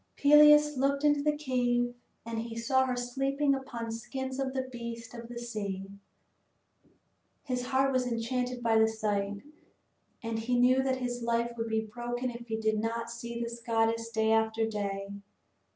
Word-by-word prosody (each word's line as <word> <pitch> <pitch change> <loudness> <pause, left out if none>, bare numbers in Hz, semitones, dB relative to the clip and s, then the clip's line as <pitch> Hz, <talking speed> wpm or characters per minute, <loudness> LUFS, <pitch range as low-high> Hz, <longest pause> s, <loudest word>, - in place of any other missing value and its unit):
Peleus 295 0 +7
looked 275 +2 +1
into 290 -1 +4
the 300 0 +1
cave 245 -3 0 0.3
and 230 -1 -3
he 230 0 -5
saw 260 +3 +2
her 250 - -1
sleeping 270 +3 0
upon 240 -4 -4
skins 260 +3 -5
of 270 -1 -1
the 260 - 0
beasts 235 -1 -7
of 235 -1 -8
the 240 - -7
sea. 200 -5 -5 1.5
His 250 -2 -3
heart 270 +1 +2
was 255 -1 +1
enchanted 245 +1 -2
by 225 -1 +4
the 220 - +5
sight, 205 -2 -2 0.8
and 225 0 -2
he 245 +2 0
knew 255 +2 +5
that 265 -1 +1
his 245 -1 -3
life 235 0 0
would 230 -1 -3
be 220 0 +1
broken 240 +3 -4
if 235 0 -9
he 220 -1 -2
did 220 -1 +1
not 230 +1 -2
see 235 0 -6
this 235 0 -5
goddess 230 0 +1
day 220 -1 +1
after 220 0 +2
day. 200 -2 -3
235 Hz, 170 wpm, -30 LUFS, 225-260 Hz, 1.5 s, Peleus